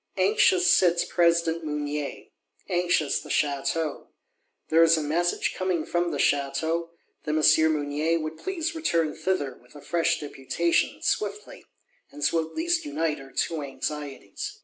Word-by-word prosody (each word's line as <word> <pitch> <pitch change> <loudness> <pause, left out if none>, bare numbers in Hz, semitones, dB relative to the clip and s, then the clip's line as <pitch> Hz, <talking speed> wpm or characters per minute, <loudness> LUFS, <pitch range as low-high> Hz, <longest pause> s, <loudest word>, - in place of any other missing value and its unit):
Anxious 185 -2 +3
sits 175 -2 +4
President 170 -1 +2
Mounier; 150 -1 -3 0.4
anxious 175 -4 +1
the - - -12
Château. 150 +2 -1 0.6
There 165 +1 +5
is 165 0 +6
a 155 - -1
message 170 +4 0
coming 185 -4 -1
from 175 0 0
the - - -3
Château, 160 +4 0 0.4
that 150 0 -1
M. 160 0 +5
Mounier 150 +3 0
would 155 0 -5
please 350 -3 -3
return 170 - 0
thither 160 -4 -1
with 125 +4 -22
a 145 - -11
fresh 170 0 +1
Deputation, 150 +4 -1
swiftly; 205 0 -3 0.4
and 295 +2 -8
so 165 -1 +2
at 160 - -12
least 340 +1 0
unite 165 - -2
our 135 0 -13
two 165 -2 -1
anxieties. 150 - -6
165 Hz, 145 wpm, -26 LUFS, 150-175 Hz, 0.6 s, is